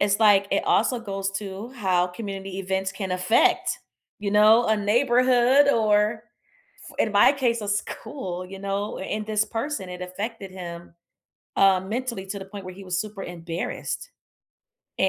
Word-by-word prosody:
it's 200 0 +2
like, 205 -2 +6
it - - +1
also 235 +4 +2
goes 195 -3 -3
to 195 +3 -6
how 190 -8 +1
community 195 0 -6
events 190 0 -2
can 190 -1 -5
affect, 185 +5 +2 0.4
you 205 -1 -3
know, 215 +3 +6
a 220 - +3
neighborhood 250 +5 +4
or 215 -2 +2 0.7
f - - -19
in 215 - +1
my 205 +6 +6
case, 245 -5 0
a 210 - -5
school, 200 -2 -4
you 195 +1 -9
know, 200 +1 -3
and 210 +2 -4
this 215 0 +1
person, 225 -2 -4
it 180 0 -7
affected 195 +2 -5
him, 170 -2 -9 0.6
uh, 195 -1 +5
mentally 220 +1 -4
to 200 +1 -5
the 190 - -8
point 195 0 -9
where 185 - -7
he 195 +2 -11
was 185 -1 -2
super 210 -1 -5
embarrassed. 175 - -5 0.9
Eh 190 - +4
200 Hz, 165 wpm, -25 LUFS, 190-225 Hz, 0.9 s, like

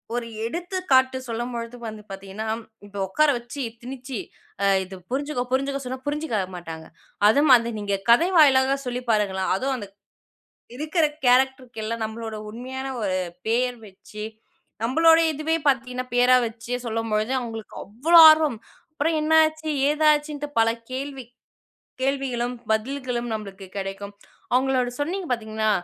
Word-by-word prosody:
ஒரு 240 -1 -2 0.2
எடுத்துக்காட்டு 280 -3 +1
சொல்லும்பொழுது 235 0 -4
வந்து 215 -1 -7
பாத்தீங்கன்னா 195 +2 -7 0.4
இப்ப 200 0 -11
உக்கார 305 +11 +3
வச்சு 240 +4 -7 0.2
திணிச்சி 255 -1 -6 0.4
அ - - +3 0.2
இது 190 +1 -9 0.2
புரிஞ்சுக்கோ 280 -1 -1
புரிஞ்சுக்கோ 275 +1 0
சொன்னா 255 +1 -4
புரிஞ்சுக்க 295 -6 -1 0.2
மாட்டாங்க. 165 -2 -8 0.4
அதுமாரி 245 -1 +5
நீங்க 200 -1 -1
கதை 240 +9 +6
வாயிலாகச் 275 -2 +5
சொல்லிப் 245 0 -4
பாருங்களேன். 200 -4 +1
அதுவும் 265 +6 -1
அந்த 205 -4 -7 0.9
இருக்கிற 310 +3 +1 0.2
கேரக்டர்க்கெல்லாம் 245 -3 +1
நம்மளோட 220 0 -6
உண்மையான 260 +4 -6
ஒரு 190 -3 0 0.3
பெயர் 245 +2 +1
வச்சு, 210 +2 -10 0.6
நம்மளோட 325 +6 +5
இதுவே 310 +2 0
பாத்தீங்கன்னா 255 -1 -1
பெயரா 250 +1 +5
வச்சே 235 +2 -5
சொல்லும்பொழுது 225 +1 -1
அவங்களுக்கு 225 -2 -7
அவ்ளோ 300 - +6
ஆர்வம். 310 -7 +1 0.3
அப்புறம் 315 +2 0
என்னாச்சு, 315 0 +3 0.2
ஏதாச்சுன்னுட்டு 295 -1 +1
பல 225 - +4 0.2
கேள்வி. 270 0 -5 0.8
கேள்விகளும் 255 -3 -1 0.2
பதில்களும் 245 +1 -2
நம்மளுக்கு 195 -3 -7
கிடைக்கும். 195 +1 -5 0.4
அவங்களோட 255 -1 +2
சொன்னீங்க 355 +5 -2
பாத்தீங்கன்னா, 220 -2 -1
250 Hz, 120 wpm, -24 LUFS, 220-280 Hz, 0.9 s, கதை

